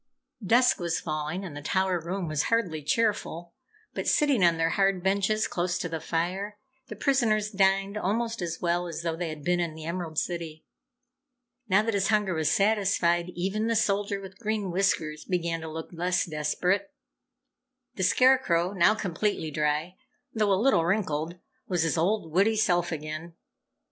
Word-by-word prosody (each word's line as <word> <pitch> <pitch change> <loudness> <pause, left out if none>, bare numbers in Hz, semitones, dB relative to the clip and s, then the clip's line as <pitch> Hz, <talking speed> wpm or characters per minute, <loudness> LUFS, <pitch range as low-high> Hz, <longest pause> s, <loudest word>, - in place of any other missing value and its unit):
Dusk 240 +6 +4
was 170 -2 -1
falling 155 +4 -3
and 160 -6 -8
the 145 - -6
tower 185 +3 0
room 175 +2 -4
was 155 -2 -1
hardly 180 -10 0
cheerful, 175 -1 -1 0.4
but - - -4
sitting 280 -9 +3
on 170 -1 +4
their 165 0 +1
hard 195 -1 +1
benches 200 +3 +1
close 175 0 -1
to - - -3
the 165 -1 -4
fire, 185 +6 -2 0.3
the - - -7
prisoners 220 -6 +1
dined 195 0 +2
almost 225 +2 -1
as 170 -1 -3
well 175 0 0
as 170 0 -6
though 165 -1 -1
they 170 0 -3
had 155 -2 -7
been 175 +2 +1
in 170 -3 -2
the 160 -1 -8
Emerald 170 -2 -4
City. 165 -3 -3 1.0
Now 195 +3 +4
that 225 0 -1
his 195 -1 +1
hunger 210 -4 +2
was 160 -2 +1
satisfied, 195 -4 +2
even 195 +5 -1
the 230 - +1
Soldier 200 -2 +1
with 190 -1 -11
Green 215 -4 -2
Whiskers 165 -5 0
began 170 -2 -2
to 160 - -6
look 160 +1 -6
less 180 +1 0
desperate. 180 - -1 1.0
The - - -6
Scarecrow, 185 -4 +3
now 200 +3 +4
completely 190 -4 -2
dry 150 +4 -1 0.4
though 215 -2 +1
a 190 - +4
little 230 -7 +3
wrinkled, 170 -3 -1 0.3
was 175 -3 +1
his 165 - 0
old, 170 0 0
witty 200 +6 +3
self 175 -5 +1
again. 155 +2 -6
180 Hz, 170 wpm, -27 LUFS, 165-205 Hz, 1.0 s, Dusk